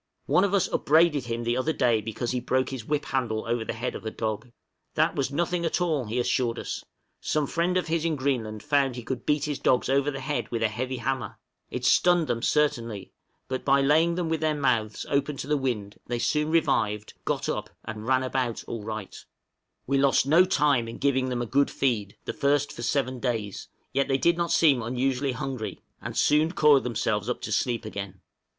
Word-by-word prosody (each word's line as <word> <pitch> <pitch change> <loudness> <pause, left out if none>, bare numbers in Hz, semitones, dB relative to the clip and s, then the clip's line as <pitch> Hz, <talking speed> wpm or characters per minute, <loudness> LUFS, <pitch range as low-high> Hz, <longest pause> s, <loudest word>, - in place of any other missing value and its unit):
One 185 - +3
of 200 0 +2
us 195 - +2
upbraided 155 -3 +3
him 115 0 -3
the 120 +1 0
other 130 +5 0
day 120 -6 +2
because 115 +3 -3
he 125 - 0
broke 130 +2 0
his 130 -5 -6
whip 150 +1 -1
handle 120 -5 -1
over 115 0 -1
the - - -4
head 120 +2 -3
of - - -7
a 110 - -2
dog. 110 +2 -4 0.4
"That - - +2
was 135 -1 0
nothing 175 +3 -1
at 165 - 0
all," 160 -7 0
he 110 +3 -3
assured 120 -1 +1
us: - - -5 0.4
some 155 -1 0
friend 175 +5 0
of 180 - 0
his 160 -1 -1
in 165 -2 +1
Greenland 120 -6 -2
found 140 -3 +2
he 120 - -6
could 125 0 -5
beat 150 -1 +2
his 145 -2 -3
dogs 125 0 +2
over 140 +1 +2
the 135 -1 -4
head 135 -3 -3
with 115 -1 -2
a 110 - +3
heavy 130 +4 -3
hammer, 130 +2 -3 0.3
it - - -4
stunned 175 -2 +4
them 115 -5 -2
certainly, 120 -9 0 0.4
but 130 0 -3
by 140 0 +4
laying 160 +5 +3
them 175 -2 -1
with 160 -1 -1
their 155 -1 +1
mouths 115 -7 0
open 140 0 0
to - - -5
the 150 +1 +1
wind, 115 -7 -3
they 120 - -1
soon 150 +6 0
revived, 105 -10 +1
got - - -1
up - - -3 0.2
and 110 0 -6
ran 130 0 +3
about 130 -3 -2
"all 115 -3 -6
right." 110 -2 -6 0.6
We 135 +1 +1
lost 135 -1 +3
no 165 +6 +6
time 145 -9 +2
in 115 - -7
giving 130 -2 +1
them 120 -1 -1
a - - -3
good 140 +4 +2
feed, 110 -7 -1
the - - -3
first 145 0 +1
for - - -8
seven 130 +1 0
days, 115 -5 -3 0.3
yet 140 0 +1
they 135 - +2
did 170 +5 +3
not 170 -1 -1
seem 140 -7 +4
unusually 130 +3 -1
hungry, 125 -2 -4 0.2
and - - -6
soon 155 +3 +3
coiled 150 -6 +5
themselves 110 -2 -1
up 125 - -1
to - - -5
sleep 120 -3 0
again. 100 -3 -6
130 Hz, 215 wpm, -26 LUFS, 115-150 Hz, 0.6 s, no